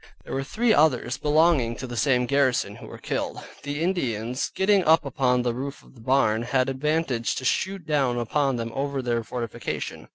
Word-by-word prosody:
There -, -, -8 dB
were 135 Hz, -, -1 dB
three 220 Hz, -, +1 dB
others 130 Hz, -, +2 dB
belonging 150 Hz, -6 st, +3 dB
to 130 Hz, -, -6 dB
the 120 Hz, -1 st, -6 dB
same 125 Hz, 0 st, +2 dB
garrison 140 Hz, -1 st, +1 dB
who -, -, -11 dB
were -, -, -9 dB
killed; -, -, -4 dB, 0.2 s
the 145 Hz, +2 st, -3 dB
Indians 125 Hz, -, -1 dB
getting 195 Hz, 0 st, +3 dB
up 160 Hz, -1 st, +4 dB
upon 125 Hz, -2 st, +1 dB
the 120 Hz, -1 st, 0 dB
roof 135 Hz, +3 st, -6 dB
of -, -, -19 dB
the 120 Hz, -, -16 dB
barn, 115 Hz, -3 st, +2 dB
had 130 Hz, +2 st, +1 dB
advantage 135 Hz, -3 st, -1 dB
to 130 Hz, -, -5 dB
shoot 190 Hz, +4 st, -1 dB
down 140 Hz, -5 st, +1 dB
upon 135 Hz, +3 st, 0 dB
them 115 Hz, -1 st, -4 dB
over 140 Hz, -1 st, -2 dB
their 120 Hz, -1 st, 0 dB
fortification. 115 Hz, 0 st, -5 dB
135 Hz, 190 wpm, -25 LUFS, 120-150 Hz, 0.2 s, up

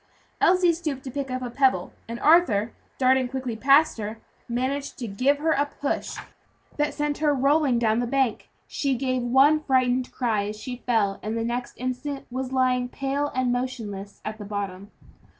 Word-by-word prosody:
Elsie 360 Hz, -1 st, +5 dB
stooped 305 Hz, -6 st, -4 dB
to 260 Hz, -, -6 dB
pick 275 Hz, 0 st, -4 dB
up 255 Hz, 0 st, -3 dB
a 245 Hz, -, -4 dB
pebble, 255 Hz, -9 st, +2 dB
and 230 Hz, +1 st, -5 dB
Arthur, 240 Hz, -, +4 dB, 0.3 s
darting 260 Hz, -1 st, +3 dB
quickly 255 Hz, -2 st, -4 dB
past 275 Hz, +4 st, +4 dB
her, 215 Hz, +1 st, -4 dB, 0.3 s
managed 265 Hz, +4 st, -2 dB
to 240 Hz, -, -5 dB
give 255 Hz, +8 st, +2 dB
her 320 Hz, +2 st, 0 dB
a 290 Hz, -1 st, +2 dB
push 285 Hz, 0 st, -3 dB, 0.6 s
that 295 Hz, 0 st, +1 dB
sent 295 Hz, -1 st, -1 dB
her 295 Hz, -2 st, +2 dB
rolling 275 Hz, -1 st, +3 dB
down 225 Hz, -1 st, +2 dB
the 245 Hz, -, -1 dB
bank. 265 Hz, -3 st, 0 dB, 0.2 s
She 275 Hz, -2 st, -1 dB
gave 255 Hz, 0 st, -1 dB
one 270 Hz, +5 st, +5 dB
frightened 255 Hz, -3 st, +1 dB
cry 220 Hz, -5 st, 0 dB
as 210 Hz, 0 st, -6 dB
she 250 Hz, +2 st, -6 dB
fell, 210 Hz, -5 st, +1 dB
and 220 Hz, +2 st, -3 dB
the 230 Hz, -, -1 dB
next 240 Hz, +1 st, -3 dB
instant 255 Hz, +3 st, -4 dB
was 260 Hz, +1 st, -3 dB
lying 255 Hz, -1 st, +1 dB
pale 275 Hz, +2 st, -2 dB
and 255 Hz, -1 st, +1 dB
motionless 220 Hz, -6 st, -4 dB
at 215 Hz, +1 st, -5 dB
the -, -, -6 dB
bottom. 200 Hz, -1 st, -5 dB
255 Hz, 180 wpm, -25 LUFS, 230-280 Hz, 0.6 s, Elsie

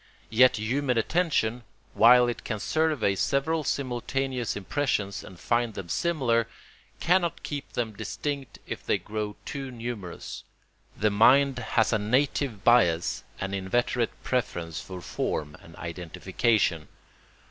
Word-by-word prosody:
Yet 125 Hz, +2 st, +6 dB
human 125 Hz, +4 st, 0 dB
attention, 125 Hz, -4 st, +1 dB, 0.3 s
while 125 Hz, +2 st, +7 dB
it 120 Hz, -, -3 dB
can 105 Hz, -3 st, -3 dB
survey 155 Hz, -6 st, +1 dB
several 140 Hz, +9 st, 0 dB
simultaneous 130 Hz, -2 st, -2 dB
impressions 100 Hz, -2 st, -1 dB
and 90 Hz, -2 st, -12 dB
find 120 Hz, -2 st, 0 dB
them 90 Hz, -3 st, -6 dB
similar, 125 Hz, -, +1 dB, 0.5 s
cannot 175 Hz, -1 st, +1 dB
keep 145 Hz, -2 st, -5 dB
them 115 Hz, -3 st, -2 dB
distinct 140 Hz, +5 st, -4 dB
if -, -, -6 dB
they -, -, +1 dB
grow 105 Hz, -1 st, -4 dB
too 140 Hz, -3 st, -5 dB
numerous. 115 Hz, -7 st, -6 dB, 0.5 s
The 105 Hz, 0 st, +2 dB
mind 130 Hz, +5 st, +5 dB
has 115 Hz, -1 st, +1 dB
a 110 Hz, -, +2 dB
native 125 Hz, 0 st, 0 dB
bias 90 Hz, -9 st, +3 dB, 0.2 s
and 100 Hz, 0 st, -3 dB
inveterate 115 Hz, +5 st, -1 dB
preference 85 Hz, -9 st, -2 dB
for 95 Hz, -2 st, -8 dB
form 75 Hz, -3 st, -3 dB
and 80 Hz, -, -14 dB
identification. 90 Hz, +1 st, -1 dB
120 Hz, 125 wpm, -27 LUFS, 100-135 Hz, 0.5 s, while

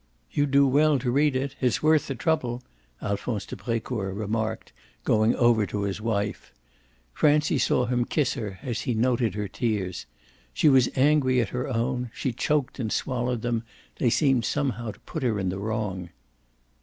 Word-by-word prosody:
"You'd 145 Hz, 0 st, +1 dB
do 140 Hz, +1 st, +5 dB
well 145 Hz, +2 st, +4 dB
to 125 Hz, -1 st, -1 dB
read 145 Hz, +1 st, +2 dB
it 135 Hz, +1 st, -2 dB
it's 125 Hz, -2 st, +1 dB
worth 155 Hz, -1 st, +4 dB
the 135 Hz, -, -3 dB
trouble," 125 Hz, -5 st, -1 dB, 0.4 s
Alphonse 100 Hz, +1 st, -2 dB
de -, -, -7 dB
Brecourt 110 Hz, -2 st, -3 dB
remarked, 110 Hz, +1 st, -3 dB, 0.3 s
going 110 Hz, +1 st, +3 dB
over 115 Hz, -4 st, +3 dB
to 100 Hz, -1 st, -3 dB
his 100 Hz, +1 st, -3 dB
wife. 105 Hz, -2 st, -2 dB, 0.6 s
Francie 150 Hz, -, +3 dB
saw 125 Hz, -, +2 dB
him 120 Hz, 0 st, 0 dB
kiss 145 Hz, -1 st, 0 dB
her 105 Hz, -7 st, -5 dB
as 120 Hz, -3 st, -3 dB
he 120 Hz, -, -1 dB
noted 120 Hz, -3 st, +1 dB
her 105 Hz, -1 st, -2 dB
tears. 95 Hz, -, -2 dB, 0.5 s
She 155 Hz, -, +4 dB
was 130 Hz, -3 st, +5 dB
angry 135 Hz, -2 st, +3 dB
at 115 Hz, -, 0 dB
her 125 Hz, 0 st, -3 dB
own; 125 Hz, 0 st, -1 dB
she 130 Hz, -, -1 dB
choked 145 Hz, +2 st, -1 dB
and 110 Hz, -4 st, -2 dB
swallowed 125 Hz, -2 st, -1 dB
them; 120 Hz, -1 st, 0 dB, 0.4 s
they 120 Hz, -, +2 dB
seemed 135 Hz, -1 st, +3 dB
somehow 130 Hz, -5 st, -1 dB
to -, -, -9 dB
put 160 Hz, -, -6 dB
her 120 Hz, -5 st, +1 dB
in 95 Hz, -2 st, -1 dB
the 95 Hz, +2 st, -3 dB
wrong. 100 Hz, -4 st, -3 dB
120 Hz, 175 wpm, -26 LUFS, 110-135 Hz, 0.6 s, do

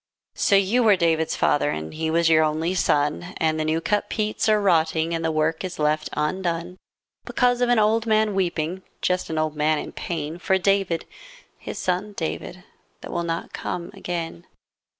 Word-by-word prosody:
lO 200 Hz, -, +6 dB
you 200 Hz, +6 st, +2 dB
were 215 Hz, -4 st, +6 dB
David's 165 Hz, -3 st, +1 dB
father, 145 Hz, 0 st, +2 dB
And 80 Hz, -, -4 dB
he 160 Hz, 0 st, -2 dB
was 165 Hz, +1 st, +2 dB
your 160 Hz, -1 st, +5 dB
only 155 Hz, +3 st, 0 dB
son, 165 Hz, +1 st, 0 dB
And 155 Hz, -1 st, +1 dB
the -, -, +1 dB
new 155 Hz, +1 st, +1 dB
cut 205 Hz, +4 st, -1 dB
peats 215 Hz, 0 st, -1 dB
are 215 Hz, -1 st, +4 dB
rotting 165 Hz, -4 st, +2 dB
And 165 Hz, 0 st, -2 dB
the 160 Hz, -, +1 dB
work 160 Hz, +2 st, 0 dB
is 185 Hz, -1 st, -5 dB
left 155 Hz, 0 st, 0 dB
undone. 170 Hz, +2 st, -2 dB, 0.5 s
Because 245 Hz, -1 st, +1 dB
of 245 Hz, -, +2 dB
an 245 Hz, -, +4 dB
old 220 Hz, +1 st, +2 dB
man 215 Hz, -1 st, +3 dB
weeping, 175 Hz, -1 st, -1 dB, 0.2 s
Just 180 Hz, 0 st, 0 dB
an 160 Hz, -, -3 dB
old 155 Hz, -1 st, 0 dB
man 155 Hz, +1 st, +2 dB
in -, -, -5 dB
pain. 165 Hz, -1 st, -4 dB
For 190 Hz, +1 st, +2 dB
David, 195 Hz, -3 st, +1 dB, 0.5 s
his -, -, -7 dB
son 185 Hz, +3 st, -1 dB
David, 180 Hz, +1 st, -5 dB, 0.4 s
That -, -, -8 dB
will 175 Hz, -, -1 dB
not 165 Hz, 0 st, -4 dB
come 170 Hz, 0 st, -4 dB
again. 165 Hz, -, -5 dB
170 Hz, 185 wpm, -24 LUFS, 160-195 Hz, 0.5 s, lO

